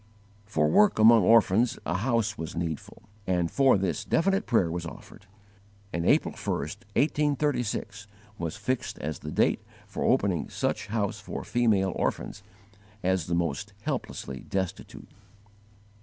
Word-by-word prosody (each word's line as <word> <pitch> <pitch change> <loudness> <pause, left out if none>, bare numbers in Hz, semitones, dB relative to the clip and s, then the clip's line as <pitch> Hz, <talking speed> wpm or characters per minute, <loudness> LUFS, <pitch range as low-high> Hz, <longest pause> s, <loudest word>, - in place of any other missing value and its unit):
For 105 - +1
work 210 +2 +4
among 110 +1 +7
orphans 115 +3 +4
a 85 - -1
house 115 -1 0
was 80 -3 -6
needful, 85 0 -5 0.2
and 90 -2 +1
for 135 -5 +4
this 90 -5 -1
definite 195 +4 +1
prayer 95 -8 +2
was 85 0 -3
offered; 90 +4 -11 0.7
and 85 0 -1
April - - +3
1, - - -12
1836, 140 -8 -1 0.3
was 85 -1 -3
fixed 130 -1 -2
as 75 +1 -4
the 75 - -7
date - - +2 0.2
for - - -5
opening 90 -8 +1
such 110 0 -2
house 105 -1 -2
for 105 - -6
female 105 -6 +2
orphans, - - -2 0.6
as 95 -3 +1
the 85 - 0
most 85 +4 -2
helplessly 65 -1 -4
destitute. 95 +3 -5
100 Hz, 135 wpm, -27 LUFS, 85-115 Hz, 0.7 s, among